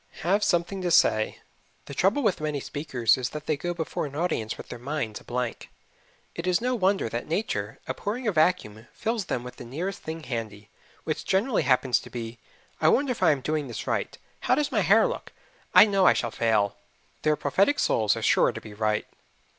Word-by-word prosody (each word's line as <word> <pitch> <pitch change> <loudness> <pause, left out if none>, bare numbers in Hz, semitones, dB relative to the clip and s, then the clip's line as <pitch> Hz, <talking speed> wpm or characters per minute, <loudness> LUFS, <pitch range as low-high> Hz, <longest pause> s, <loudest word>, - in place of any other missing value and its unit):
Have 195 +5 +2
Something 185 0 0
to 180 - -1
Say 110 -9 +3 0.4
The - - -8
trouble 200 - +2
with 200 -8 +1
many 150 -2 -1
speakers 130 -5 +1
is 125 -2 -2
that 150 +1 -7
they 155 - +1
go 175 +5 -3
before 160 -3 -3
an 140 - -11
audience 155 -9 -1
with - - -10
their 120 - -7
minds 125 -4 -4
a - - -17
blank. 125 -1 -4 0.6
It 170 +2 -5
is 180 -1 +3
no 250 +2 0
wonder 195 - +1
that 120 +2 -4
nature, 115 - -2
abhorring 210 - -3
a - - +3
vacuum, 155 - +1
fills 225 -3 -2
them 120 - -2
with 125 0 -9
the - - -8
nearest 170 +11 -4
thing 160 0 -6
handy, 110 -5 -5 0.3
which 155 - -3
generally 205 +5 +1
happens 125 -2 +2
to - - -12
be, 115 -1 -6 0.4
"I 155 - +4
wonder 270 - +3
if 240 - -4
I 180 - +5
am 145 -3 +2
doing 150 +1 -1
this 120 - -6
right! - - -2 0.2
How - - +2
does 295 -1 0
my - - +2
hair - - +5
look? - - -4 0.4
I - - +10
know 195 -3 +3
I - - +7
shall 115 - -2
fail." 110 -4 +1 0.4
Their 155 0 +2
prophetic 190 - +2
souls 110 - +2
are - - -5
sure - - +4
to - - -7
be 105 - -11
right. 105 0 0
150 Hz, 210 wpm, -26 LUFS, 120-190 Hz, 0.6 s, I